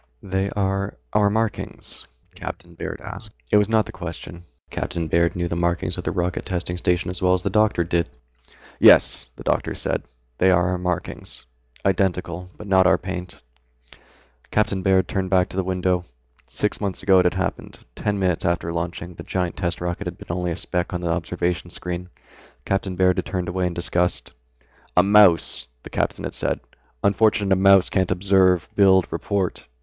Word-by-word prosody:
"They 95 Hz, +1 st, -1 dB
are 100 Hz, -1 st, -1 dB, 0.2 s
our 105 Hz, -1 st, +4 dB
markings?" 110 Hz, +1 st, -3 dB, 0.3 s
Captain -, -, -8 dB
Baird -, -, -6 dB
asked. -, -, -7 dB, 0.2 s
It -, -, +6 dB
was 105 Hz, 0 st, +3 dB
not 110 Hz, -2 st, +3 dB
the -, -, -9 dB
question. 85 Hz, -1 st, -8 dB, 0.3 s
Captain 85 Hz, -2 st, -3 dB
Baird 85 Hz, +1 st, +2 dB
knew 85 Hz, -1 st, -1 dB
the 85 Hz, -, -3 dB
markings 85 Hz, 0 st, 0 dB
of 90 Hz, -, -5 dB
the -, -, -1 dB
Rocket 90 Hz, -1 st, -1 dB
Testing 90 Hz, -1 st, -2 dB
Station 90 Hz, 0 st, 0 dB
as 90 Hz, -, -1 dB
well 90 Hz, 0 st, +4 dB
as 90 Hz, -, -1 dB
the 100 Hz, -, -1 dB
doctor 105 Hz, -4 st, +3 dB
did. 85 Hz, 0 st, 0 dB, 0.7 s
"Yes," -, -, +6 dB
the -, -, -11 dB
doctor -, -, 0 dB
said, -, -, -1 dB, 0.4 s
"they 95 Hz, -, +5 dB
are 90 Hz, -1 st, +3 dB
our 90 Hz, -1 st, -1 dB
markings. 90 Hz, -7 st, -4 dB, 0.4 s
Identical. 90 Hz, -2 st, 0 dB
But 105 Hz, -, -9 dB
not 95 Hz, -2 st, +4 dB
our 95 Hz, -, +5 dB
paint." 90 Hz, -4 st, -6 dB, 1.1 s
Captain 105 Hz, -3 st, +1 dB
Baird 95 Hz, 0 st, +3 dB
turned 95 Hz, -2 st, -2 dB
back 90 Hz, -1 st, +3 dB
to -, -, -9 dB
the 95 Hz, -, 0 dB
window. 90 Hz, -1 st, 0 dB, 0.4 s
Six -, -, -1 dB
months 100 Hz, -3 st, -2 dB
ago 95 Hz, -1 st, +6 dB
it 90 Hz, -, +3 dB
had 90 Hz, -, +2 dB
happened. 95 Hz, -1 st, -3 dB, 0.2 s
Ten 105 Hz, -, -2 dB
minutes 90 Hz, -3 st, 0 dB
after 85 Hz, -1 st, 0 dB
launching, 85 Hz, +1 st, -4 dB
the -, -, -9 dB
giant 90 Hz, -2 st, -2 dB
test 85 Hz, -2 st, -2 dB
rocket 90 Hz, 0 st, -3 dB
had 85 Hz, -, -6 dB
been 85 Hz, -, -5 dB
only 90 Hz, -1 st, -1 dB
a 85 Hz, -, -2 dB
speck 90 Hz, 0 st, -2 dB
on 90 Hz, -, -3 dB
the 85 Hz, -1 st, -1 dB
observation 85 Hz, 0 st, -2 dB
screen. 90 Hz, +1 st, -5 dB, 0.6 s
Captain 95 Hz, -1 st, -1 dB
Baird 90 Hz, 0 st, +3 dB
had -, -, -4 dB
turned 90 Hz, -2 st, -2 dB
away 90 Hz, 0 st, 0 dB
in 85 Hz, -, -4 dB
disgust. 90 Hz, 0 st, 0 dB, 0.7 s
"A 90 Hz, -, +7 dB
mouse!" 100 Hz, -10 st, +4 dB, 0.2 s
the -, -, -11 dB
captain -, -, -1 dB
had -, -, -4 dB
said, -, -, 0 dB, 0.4 s
"unfortunate 100 Hz, -1 st, +3 dB
a -, -, +4 dB
mouse 95 Hz, 0 st, +5 dB
can't 95 Hz, -2 st, +1 dB
observe, 95 Hz, -1 st, +3 dB
build, 95 Hz, -2 st, +5 dB
report. 100 Hz, -3 st, -2 dB
90 Hz, 185 wpm, -23 LUFS, 85-95 Hz, 1.1 s, A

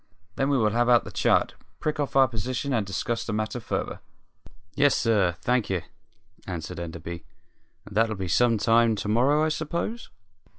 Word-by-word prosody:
Then 135 Hz, +1 st, 0 dB
we 140 Hz, -, +3 dB
will 110 Hz, -3 st, +2 dB
have 120 Hz, +2 st, +2 dB
out 120 Hz, -1 st, +5 dB
the -, -, -9 dB
chart, -, -, +2 dB, 0.3 s
prick 155 Hz, 0 st, -2 dB
off 145 Hz, -2 st, -2 dB
our 135 Hz, -1 st, +6 dB
position, 125 Hz, +4 st, -3 dB
and 115 Hz, -4 st, +1 dB
discuss 115 Hz, +4 st, -2 dB
the 110 Hz, -, -4 dB
matter 110 Hz, +3 st, -2 dB
further." 115 Hz, -, -3 dB, 0.7 s
"Yes, 140 Hz, +4 st, +3 dB
sir; 105 Hz, -7 st, +2 dB
thank 125 Hz, -2 st, +1 dB
'e," 95 Hz, -3 st, 0 dB, 0.7 s
answered 85 Hz, -4 st, -5 dB
Enderby. 85 Hz, 0 st, -7 dB, 0.6 s
"And 100 Hz, -, -12 dB
that'll 110 Hz, 0 st, +2 dB
be 95 Hz, -2 st, -4 dB
some 115 Hz, +6 st, +3 dB
time 115 Hz, +1 st, +3 dB
to 105 Hz, -, -5 dB
morrow, 130 Hz, +8 st, +3 dB
I -, -, +1 dB
s'pose?" 170 Hz, +9 st, -3 dB
115 Hz, 175 wpm, -26 LUFS, 100-135 Hz, 0.7 s, our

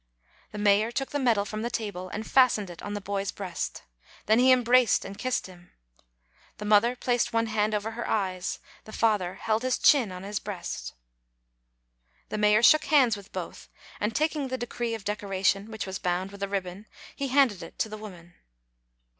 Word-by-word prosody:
The -, -, -8 dB
mayor 210 Hz, +2 st, +3 dB
took 270 Hz, +2 st, -3 dB
the 290 Hz, -, -1 dB
medal 230 Hz, -6 st, +2 dB
from 215 Hz, +1 st, -5 dB
the 235 Hz, -, -2 dB
table, 200 Hz, -6 st, -4 dB
and 215 Hz, +4 st, -5 dB
fastened 225 Hz, -8 st, +3 dB
it 170 Hz, -, -11 dB
on 205 Hz, 0 st, -5 dB
the -, -, -3 dB
boy's 200 Hz, 0 st, -3 dB
breast. 185 Hz, -4 st, -5 dB, 0.4 s
Then 220 Hz, +3 st, +4 dB
he 260 Hz, +1 st, +6 dB
embraced 250 Hz, -1 st, +4 dB
and 195 Hz, -, -7 dB
kissed 255 Hz, +4 st, -2 dB
him. 180 Hz, -2 st, -14 dB, 0.9 s
The 210 Hz, -, -7 dB
mother 215 Hz, +4 st, +4 dB
placed 245 Hz, -1 st, 0 dB
one 230 Hz, 0 st, +2 dB
hand 215 Hz, -1 st, 0 dB
over 210 Hz, +2 st, -2 dB
her 235 Hz, +1 st, -5 dB
eyes; 185 Hz, -3 st, -1 dB, 0.3 s
the 215 Hz, -, -11 dB
father 205 Hz, -5 st, +1 dB
held 220 Hz, 0 st, -1 dB
his 255 Hz, 0 st, 0 dB
chin 255 Hz, -9 st, +4 dB
on 180 Hz, 0 st, -8 dB
his 205 Hz, +1 st, -3 dB
breast. -, -, -6 dB, 1.3 s
The 215 Hz, -, -3 dB
mayor 210 Hz, +1 st, +4 dB
shook 310 Hz, +5 st, +6 dB
hands 260 Hz, -7 st, +4 dB
with 200 Hz, 0 st, -12 dB
both; -, -, -7 dB, 0.3 s
and 210 Hz, +2 st, -1 dB
taking 305 Hz, -2 st, 0 dB
the 260 Hz, 0 st, -3 dB
decree 240 Hz, -1 st, -3 dB
of 210 Hz, -3 st, -10 dB
decoration, 200 Hz, 0 st, 0 dB
which 220 Hz, -1 st, -5 dB
was 190 Hz, -1 st, -5 dB
bound 180 Hz, +2 st, -2 dB
with 200 Hz, 0 st, -12 dB
a 200 Hz, -, -1 dB
ribbon, 195 Hz, +1 st, -4 dB, 0.3 s
he 280 Hz, -, -3 dB
handed 260 Hz, -8 st, +3 dB
it 165 Hz, -, -10 dB
to -, -, 0 dB
the 215 Hz, -, -7 dB
woman. 180 Hz, -5 st, -11 dB
215 Hz, 190 wpm, -27 LUFS, 195-240 Hz, 1.3 s, he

